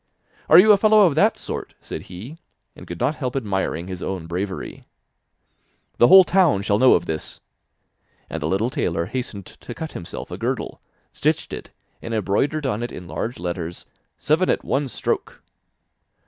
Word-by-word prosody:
'Are 160 Hz, -, +9 dB
you 210 Hz, +4 st, +8 dB
a 205 Hz, -, +7 dB
fellow 215 Hz, +1 st, +5 dB
of 170 Hz, -, +3 dB
that 200 Hz, +10 st, +3 dB
sort?' -, -, -6 dB
said -, -, -7 dB
he, 110 Hz, -, -9 dB, 0.4 s
and -, -, -12 dB
could 85 Hz, -1 st, -7 dB
not 150 Hz, -, +1 dB
help 130 Hz, -4 st, -4 dB
admiring 95 Hz, -8 st, -2 dB
his 95 Hz, -1 st, -7 dB
own 95 Hz, -4 st, -4 dB
bravery. 95 Hz, +3 st, -5 dB, 1.1 s
'The 120 Hz, -, +7 dB
whole 190 Hz, +5 st, +9 dB
town 175 Hz, -, +3 dB
shall 100 Hz, +1 st, +1 dB
know 130 Hz, -, +6 dB
of 85 Hz, -, -1 dB
this!' 80 Hz, -1 st, -4 dB, 0.9 s
And 80 Hz, -, -5 dB
the 75 Hz, -, -1 dB
little 100 Hz, +8 st, 0 dB
tailor 85 Hz, -6 st, -1 dB
hastened 105 Hz, -3 st, -5 dB
to 120 Hz, -, -11 dB
cut 160 Hz, -1 st, -6 dB
himself 85 Hz, -, -8 dB
a -, -, -6 dB
girdle, -, -, -3 dB, 0.3 s
stitched -, -, -1 dB
it, -, -, -7 dB, 0.3 s
and 115 Hz, 0 st, -4 dB
embroidered 110 Hz, -, 0 dB
on 115 Hz, -4 st, -1 dB
it 120 Hz, -, -4 dB
in 90 Hz, -, -8 dB
large 120 Hz, +7 st, -4 dB
letters: 85 Hz, -1 st, -5 dB, 0.3 s
'Seven 160 Hz, +5 st, +1 dB
at -, -, +1 dB
one 140 Hz, +1 st, 0 dB
stroke! 110 Hz, -, -3 dB
115 Hz, 175 wpm, -22 LUFS, 90-150 Hz, 1.1 s, Are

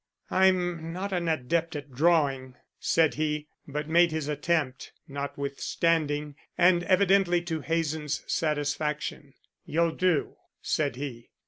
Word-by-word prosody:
"I'm 175 Hz, -3 st, +2 dB
not 190 Hz, +3 st, -4 dB
an 175 Hz, -2 st, -1 dB
adept 160 Hz, +2 st, 0 dB
at 145 Hz, -1 st, -6 dB
drawing," 135 Hz, -3 st, +2 dB, 0.2 s
said 160 Hz, -2 st, +3 dB
he, 150 Hz, -1 st, -1 dB, 0.2 s
but 150 Hz, +1 st, -4 dB
made 170 Hz, +1 st, +4 dB
his 155 Hz, -2 st, -2 dB
attempt, 150 Hz, -3 st, -1 dB
notwithstanding, 145 Hz, +1 st, -1 dB, 0.2 s
and 175 Hz, 0 st, +5 dB
evidently 190 Hz, -2 st, +4 dB
to 165 Hz, -3 st, -3 dB
Hazen's 155 Hz, -2 st, -1 dB
satisfaction. 150 Hz, -2 st, -2 dB, 0.3 s
"You'll 165 Hz, +1 st, +1 dB
do," 180 Hz, -4 st, 0 dB, 0.2 s
said 145 Hz, -5 st, -1 dB
he. 125 Hz, -3 st, -7 dB
155 Hz, 115 wpm, -28 LUFS, 145-170 Hz, 0.3 s, and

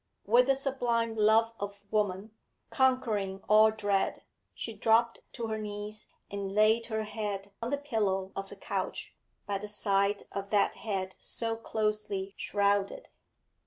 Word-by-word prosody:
With 240 Hz, +4 st, +5 dB
the 270 Hz, -, +4 dB
sublime 245 Hz, -4 st, 0 dB
love 220 Hz, +1 st, +4 dB
of 200 Hz, 0 st, -6 dB
woman, 210 Hz, -1 st, 0 dB, 0.4 s
conquering 220 Hz, -8 st, +1 dB
all 215 Hz, +1 st, +7 dB
dread, 205 Hz, -3 st, 0 dB, 0.3 s
she 225 Hz, -, -5 dB
dropped 225 Hz, +2 st, +3 dB
to 235 Hz, -, -4 dB
her 220 Hz, -1 st, -2 dB
knees 210 Hz, 0 st, -6 dB, 0.2 s
and 200 Hz, -1 st, -4 dB
laid 220 Hz, +2 st, +4 dB
her 220 Hz, -1 st, -1 dB
head 205 Hz, -2 st, -4 dB
on 230 Hz, -, -2 dB
the 285 Hz, -, +1 dB
pillow 205 Hz, -9 st, -1 dB
of 195 Hz, 0 st, -4 dB
the -, -, -9 dB
couch 195 Hz, -, -4 dB, 0.3 s
by 200 Hz, -1 st, -2 dB
the 210 Hz, -, -6 dB
side 200 Hz, -1 st, +1 dB
of 200 Hz, 0 st, -4 dB
that 205 Hz, -1 st, +3 dB
head 190 Hz, -3 st, -3 dB
so 225 Hz, -1 st, -2 dB
closely 210 Hz, -3 st, -2 dB
shrouded. 200 Hz, -, 0 dB
210 Hz, 145 wpm, -30 LUFS, 200-225 Hz, 0.4 s, all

